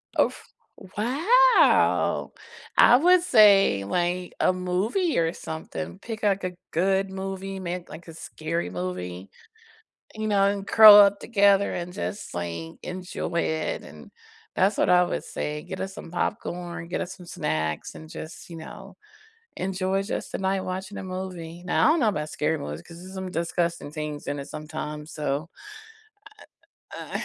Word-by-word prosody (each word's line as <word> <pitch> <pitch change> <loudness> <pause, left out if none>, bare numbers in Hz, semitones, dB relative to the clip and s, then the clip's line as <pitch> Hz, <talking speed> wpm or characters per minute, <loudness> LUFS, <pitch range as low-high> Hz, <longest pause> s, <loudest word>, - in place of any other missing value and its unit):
Oh - - +4
f - - -13 0.5
wow! 370 - +4 0.5
I 240 - +8
would 360 +5 +5
say, 205 - +6
like, 175 - -1
a - - +3
movie 190 - 0
or 165 0 +1
something. 85 - -6
Pick, 225 -2 -7
like, 200 -2 +1
a 180 -1 -3 0.2
good 190 +3 +1
movie, 195 0 -5
ma 180 -1 -3
like 170 - -11
a 165 - -9
scary 160 - -4
movie, 90 +1 -5 0.9
you 215 0 -3
know, 200 -2 +3
and 200 0 -1
curl 215 -2 +10
up 200 -1 +6
together 200 -2 +3
and 175 0 -5
just, 200 +2 -5
like, 85 -2 -4
enjoy 180 -2 -3
it 160 -1 -2
and - - -13 0.5
that's 200 +2 +3
what - - +2
I 180 0 +6
would - - -3
say. 150 0 -4
Get 185 - -7
us 190 0 -4
some - - -10
popcorn, 175 -2 -4
get - - -2
us 185 +2 -5
some 180 - -13
snacks, 80 - -3
and 160 - -11
just, 165 +1 -9
you 170 - -8
know, 160 - -10 0.6
enjoy 190 +1 -1
just 195 - -4
the - - -3
night 190 0 0
watching 190 +2 -5
a - - -5
movie. 180 -2 -6
Now 180 - +2
I - - +6
don't 330 - +1
know 230 - +3
about 150 -7 -2
scary 155 +1 -1
movies 75 - -6
'cause 170 - -13
there's 185 +2 -11
some 190 -1 -5
disgusting 170 -2 -2
things 150 -1 -6
in 145 - -3
it 140 - -8
sometimes 150 0 -6
so 150 +1 -2 1.5
Uh - - -5
180 Hz, 165 wpm, -25 LUFS, 155-195 Hz, 1.5 s, curl